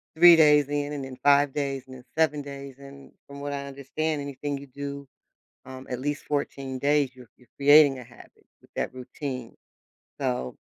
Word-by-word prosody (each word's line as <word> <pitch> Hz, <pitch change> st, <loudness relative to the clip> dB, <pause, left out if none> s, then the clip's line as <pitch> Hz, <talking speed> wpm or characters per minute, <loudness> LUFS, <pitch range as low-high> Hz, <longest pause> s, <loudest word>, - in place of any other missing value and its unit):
3 170 Hz, +1 st, +9 dB
days 150 Hz, -3 st, +5 dB
in 145 Hz, 0 st, -2 dB
and 140 Hz, -, -4 dB
then 130 Hz, -1 st, -9 dB
5 145 Hz, 0 st, +5 dB
days 140 Hz, -2 st, -2 dB
and 130 Hz, -, -11 dB
then 125 Hz, -, -13 dB
7 155 Hz, -2 st, +2 dB
days 140 Hz, -1 st, -9 dB
and, 140 Hz, 0 st, -13 dB, 0.2 s
from 140 Hz, 0 st, -10 dB
what 145 Hz, 0 st, -4 dB
I 140 Hz, 0 st, -4 dB
understand, 145 Hz, +3 st, -3 dB
anything 140 Hz, 0 st, -4 dB
you 140 Hz, +1 st, -11 dB
do, 140 Hz, +1 st, -7 dB, 0.6 s
um, 130 Hz, 0 st, -10 dB
at 125 Hz, -1 st, -3 dB
least 145 Hz, +2 st, -3 dB
14 135 Hz, -2 st, -3 dB
days 145 Hz, -1 st, +2 dB
you're 125 Hz, -3 st, -15 dB
you're 125 Hz, -, -23 dB
creating 145 Hz, -1 st, +6 dB
a -, -, -9 dB
habit 120 Hz, 0 st, -18 dB, 0.2 s
with -, -, -23 dB
that -, -, -2 dB
routine. 130 Hz, -1 st, -7 dB, 0.6 s
So, 65 Hz, 0 st, -2 dB
140 Hz, 185 wpm, -26 LUFS, 130-145 Hz, 0.6 s, 3